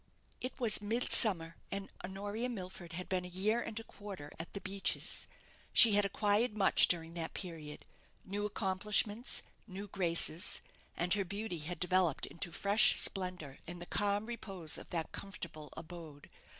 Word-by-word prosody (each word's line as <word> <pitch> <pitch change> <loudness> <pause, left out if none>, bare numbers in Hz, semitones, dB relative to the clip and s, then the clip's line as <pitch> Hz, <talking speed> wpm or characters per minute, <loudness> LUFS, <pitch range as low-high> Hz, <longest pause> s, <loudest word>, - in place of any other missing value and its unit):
It 255 - -5
was 225 -4 +6
midsummer, 205 -6 +2
and 195 0 -4 0.2
Honoria 205 +6 -4
Milford 185 -6 -7
had 180 +2 -4
been 185 -1 -1
a - - -6
year 200 +6 0
and 225 -1 -3
a - - -8
quarter 195 -10 -9
at 165 - -6
"The 200 - -4
Beeches." 195 +1 0 0.5
She 230 - +9
had 205 0 +5
acquired 210 +3 +1
much 195 - +5
during 165 -1 -1
that 165 -1 -4
period; 160 -5 -7 0.4
new 200 +2 -3
accomplishments, 210 +3 +2 0.2
new 200 +1 -7
graces; 175 -2 +1 0.4
and 175 +1 +3
her 205 -1 +2
beauty 200 -1 -4
had 170 +4 -5
developed 180 -4 +2
into 170 +1 -4
fresh 200 +5 +4
splendour 180 -8 0
in 175 +1 -6
the 175 - -6
calm 205 +2 0
repose 195 -9 -1
of - - -12
that 165 -2 -3
comfortable 155 -6 -7
abode. 160 -3 -10
190 Hz, 155 wpm, -34 LUFS, 170-205 Hz, 0.5 s, She